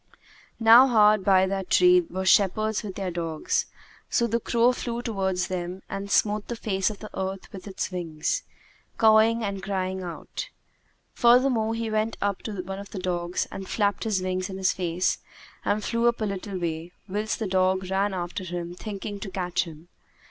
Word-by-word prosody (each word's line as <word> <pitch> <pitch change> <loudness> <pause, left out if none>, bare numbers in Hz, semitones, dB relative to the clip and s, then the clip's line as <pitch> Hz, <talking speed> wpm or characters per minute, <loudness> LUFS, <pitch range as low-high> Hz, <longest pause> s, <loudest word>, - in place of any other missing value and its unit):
'" - - -27
Now 230 +3 +8
hard 215 -4 +5
by 190 -1 +5
that 190 -1 -3
tree 180 0 +6
were 185 +2 -5
shepherds 210 +3 +3
with 200 -3 -7
their 190 -2 -3
dogs; 165 -2 -1 0.4
so 235 - +2
the 235 0 0
crow 235 +2 +3
flew 240 -1 -4
towards 190 -5 -1
them 180 +1 -4
and 195 0 -4
smote 210 +1 +2
the 240 - -3
face 195 -4 0
of 215 - -7
the 215 - -9
earth 190 0 -4
with 190 - -9
his 195 -1 -4
wings, 165 -4 -2 0.6
cawing 220 +1 +5
and 200 -2 -3
crying 190 -1 -2
out. 175 -3 -6 0.6
Furthermore 240 -2 +4
he 225 -1 -3
went 215 +1 0
up 200 -1 -1
to 205 -4 -5
one 195 +1 -6
of 200 0 -9
the 215 - -8
dogs 175 -1 -2
and 195 -1 -7
flapped 205 -2 0
his 200 -4 0
wings 185 0 -2
in 190 - -6
his 190 -1 +2
face 180 0 0 0.4
and 210 0 0
flew 230 +2 +1
up 235 0 +1
a 215 - 0
little 195 -1 -4
way, 170 0 -4
whilst 210 +3 -2
the 220 - -3
dog 185 0 +1
ran 200 +2 +1
after 180 0 -4
him 175 -1 -5
thinking 205 +2 -6
to 195 - -6
catch 180 -2 -1
him. 160 0 -12
195 Hz, 185 wpm, -26 LUFS, 185-215 Hz, 0.6 s, Now